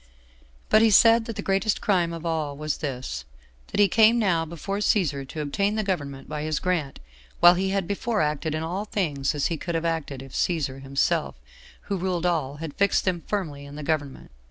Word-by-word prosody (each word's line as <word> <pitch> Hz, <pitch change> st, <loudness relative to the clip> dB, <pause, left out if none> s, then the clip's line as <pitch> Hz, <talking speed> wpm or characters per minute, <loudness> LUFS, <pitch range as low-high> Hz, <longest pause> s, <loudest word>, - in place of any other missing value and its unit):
But 215 Hz, -, +6 dB
he 225 Hz, -, +5 dB
said 225 Hz, +2 st, +6 dB
that 230 Hz, -, -5 dB
the 205 Hz, -, -4 dB
greatest 195 Hz, +2 st, +1 dB
crime 180 Hz, -5 st, +1 dB
of 165 Hz, 0 st, -7 dB
all 155 Hz, -4 st, -2 dB
was 150 Hz, -1 st, -2 dB
this, 130 Hz, -, -4 dB, 0.4 s
that -, -, -4 dB
he 205 Hz, -, +7 dB
came 220 Hz, +4 st, +5 dB
now 180 Hz, -7 st, +2 dB
before 170 Hz, +5 st, -4 dB
Cæsar 150 Hz, -10 st, +1 dB
to 155 Hz, -, -5 dB
obtain 200 Hz, +8 st, 0 dB
the 215 Hz, -, 0 dB
government 145 Hz, -9 st, -3 dB
by 150 Hz, -1 st, -4 dB
his 155 Hz, 0 st, -1 dB
grant, 170 Hz, -7 st, -1 dB, 0.4 s
while 175 Hz, -, +8 dB
he 190 Hz, +2 st, -1 dB
had 195 Hz, -2 st, -1 dB
before 210 Hz, +3 st, -1 dB
acted 150 Hz, 0 st, -1 dB
in 155 Hz, -, -2 dB
all 185 Hz, +6 st, -3 dB
things 150 Hz, -9 st, -1 dB
as 145 Hz, -, 0 dB
he 165 Hz, -, 0 dB
could 170 Hz, +2 st, -4 dB
have 165 Hz, +1 st, -1 dB
acted 155 Hz, -5 st, -2 dB
if 135 Hz, -, -13 dB
Cæsar 140 Hz, -6 st, -1 dB
himself, 135 Hz, 0 st, 0 dB, 0.5 s
who 200 Hz, -, -3 dB
ruled 180 Hz, -1 st, -1 dB
all, 155 Hz, -6 st, 0 dB
had 155 Hz, -1 st, -6 dB
fixed 200 Hz, -1 st, +1 dB
him 175 Hz, -2 st, 0 dB
firmly 160 Hz, -9 st, -3 dB
in 140 Hz, 0 st, -10 dB
the 150 Hz, -, -6 dB
government. 145 Hz, -, -3 dB
165 Hz, 205 wpm, -25 LUFS, 145-195 Hz, 0.5 s, while